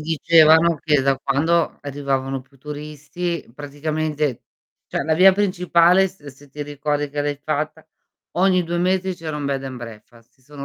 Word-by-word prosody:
dicevano 160 +1 +4
che 150 -3 +2
da 135 0 +1
quando 160 +6 +1
arrivavano 135 -1 -2
più 135 +2 -23
turisti, 150 +4 -5
praticamente 150 -1 -3 0.4
cioè - - -2
la 160 - 0
via 185 +4 +7
principale 180 -1 +3
s 190 -1 -21
ehm, 145 - -11
se 140 +2 -15
ti 145 +2 -7
ricordi 145 0 -3
che 145 0 -3
l'hai 145 0 -1
fatta, 155 +2 -4 0.5
ogni 185 -1 +3
2 170 +1 -2
mesi 185 +1 0
c'era 160 -3 -6
un 145 - -5
bed 135 -1 -2
and 130 -1 -6
breakfast, 115 0 -12
si 135 - -35
sono 140 +1 -10
150 Hz, 170 wpm, -21 LUFS, 140-170 Hz, 0.5 s, via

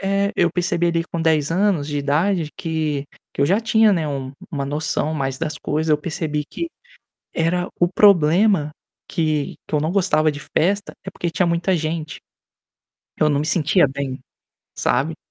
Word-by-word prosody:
É, 195 +1 +1
eu 170 - +4
percebi 175 -1 0
ali, 170 -1 +1
com 170 -1 -5
10 155 -2 +2
anos 180 -4 +1
de 145 -1 -2
idade, 155 +4 +1
que 155 -3 -2 0.3
que - - -5
eu 140 - +4
já 195 +6 +3
tinha, 220 -1 +4
né, 165 -4 0
uma 135 -2 -4 0.2
uma 140 -5 -2
noção 150 +1 -1
maior 135 -2 -2
das 160 -1 -3
coisas. 155 +2 -1
Eu 150 - +4
percebi 150 -1 -3
que 335 - -5 0.7
era 175 +2 0
o 175 - +4
problema 185 -3 +4 0.4
que 155 -4 -1
que - - -1
eu - - +2
não 155 - 0
gostava 160 -5 +2
de 145 - -8
festa 200 +7 -1
é - - -4
porque 175 - -3
tinha 175 +2 +1
muita 170 +2 +1
gente. 155 -1 -3 1.0
Eu 155 - +4
não 145 -1 +1
me 150 - -2
sentia 165 +1 +3
bem, 135 -1 -4 0.6
sabe? 145 +6 0
160 Hz, 175 wpm, -21 LUFS, 150-180 Hz, 1.0 s, eu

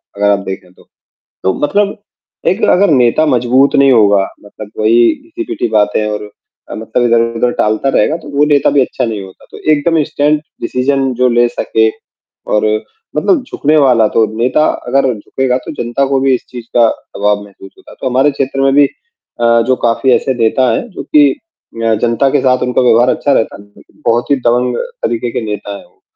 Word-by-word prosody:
अगर 105 0 +1
आप 100 - +1
देखें 95 -1 -7
तो, - - -23 0.6
तो 95 - +1
मतलब 205 +7 0 0.5
एक 190 - 0
अगर 200 +2 +3
नेता 130 +3 +3
मजबूत 130 0 +2
नहीं 140 -1 +4
होगा 105 -4 +4 0.2
मतलब 105 0 -11
वही 115 +2 +4 0.2
घिसी-पीटी 335 - -4
बातें 105 0 +1
और 105 0 -5 0.5
मतलब 110 +2 -2
इधर-उधर 115 0 +1
टालता 110 +5 0
रहेगा, 155 +3 +1
तो 155 - -14
वो 145 - +4
नेता 145 -2 +2
भी 140 - +2
अच्छा 130 0 -2
नहीं 110 -3 -4
होता। 95 -1 -15
तो - - -11
एकदम 155 +2 +2
स्टैंड 150 +1 0 0.2
डिसीज़न 135 0 -1
जो 125 +1 +2
ले 120 0 +3
सके 110 -1 0 0.6
और 105 - +2 0.5
मतलब 340 -9 +1
झुकने 155 +2 +1
वाला 125 -6 +4
तो 110 - +4
नेता 125 +6 +2 0.2
अगर 130 0 +1
झुकेगा 125 +4 -2
तो - - -6
जनता 120 +4 -1
को 135 0 0
भी 135 0 +2
इस - - -8
चीज़ 120 -2 -9
का 120 -1 +5 0.3
प्रभाव 105 0 0
महसूस 95 -1 -14
होता। - - -16
तो - - -1
हमारे 135 +4 +2
क्षेत्र 135 0 -2
में 135 0 +2
भी 145 +1 +5 0.6
अ, 115 0 +4
जो 130 - +3
काफ़ी 120 +2 0
ऐसे 130 - 0
नेता 125 +2 +1
हैं 115 - -2
जो - - -7
कि 145 -2 +4
अ, 115 - -5
जनता 120 +3 +1
के - - +1
साथ 130 -1 +2
उनका 125 0 0
व्यवहार 120 0 +4
अच्छा 145 - 0
रहता 110 -5 -1
है। 100 0 -20 0.2
बहुत 120 +1 +1
ही - - +5
दबंग 125 +1 +1 0.3
तरीके 120 +1 -2
के - - -3
नेता 105 -1 -5
हैं - - -14
वो। - - -30
125 Hz, 190 wpm, -13 LUFS, 110-140 Hz, 0.6 s, का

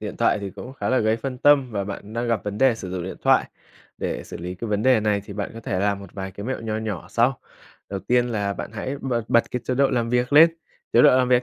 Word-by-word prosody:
điện - - -6
thoại - - +2
thì 100 -1 -5
cũng 125 +7 -9
khá - - -4
là 130 - +3
gây 110 +1 +2
phân 130 +1 -5
tâm 140 -2 +4
và 100 -3 -2
bạn 100 +1 -7
đang 120 +1 -2
gặp 115 -3 0
vấn 105 0 -4
đề 130 -3 +4
sử 95 -4 -7
dụng 90 -1 -3
điện 95 - -6
thoại. - - +4 0.5
Để - - -3
xử - - -8
lý 90 +2 -6
cái 115 +4 -6
vấn 105 0 0
đề 130 -2 +4
này 105 -1 +1
thì 105 - -9
bạn 100 0 -4
có 115 - -8
thể 95 -3 -2
làm 100 0 +1
một 100 -3 -12
vài 95 -1 -5
cái 100 +3 -7
mẹo 130 -1 -3
nho 110 -1 -3
nhỏ 110 -6 -4
sau. 120 +2 +2 0.5
Đầu 100 -1 -3
tiên 120 +5 +2
là 100 -4 -1
bạn - - -6
hãy 130 +5 -4
bật 120 -3 -1
bật 115 - +3
cái 125 - -2
chế 125 - -1
độ 140 +1 +3
làm 115 -2 0
việc 125 +2 +1
lên, 160 +3 +8 0.4
chế - - +6
độ 150 - +8
làm 125 - +2
việc 125 0 +4
115 Hz, 290 wpm, -23 LUFS, 100-125 Hz, 0.5 s, lên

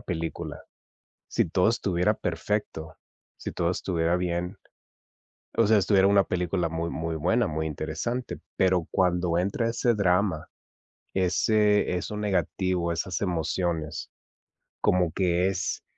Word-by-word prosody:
película, 85 -6 -4 0.7
si - - 0
todo 90 +4 +3
estuviera 100 -3 +1
perfecto, 85 -3 -3 0.4
si - - -5
todo 85 0 0
estuviera 85 -2 0
bien, 90 0 -2 1.0
o 115 - +5
sea, 110 +1 +5
estuviera 95 0 +4
una 100 0 +5
película 90 -1 -1
muy 80 +1 -2
muy 80 0 -3
buena, 100 +9 +2
muy 80 +1 -2
interesante, 80 - -3 0.2
pero 90 -3 +2
cuando 90 -2 +1
entra 100 +6 0
ese 120 0 +1
drama, 90 -4 +1 0.7
ese 105 +1 +2
eso 95 +4 -4
negativo, 95 -4 0
esas 85 +2 -2
emociones, 85 -3 -2 0.7
como 90 -2 +2
que 90 +1 +1
es 95 -1 -2
90 Hz, 120 wpm, -27 LUFS, 85-100 Hz, 1.0 s, o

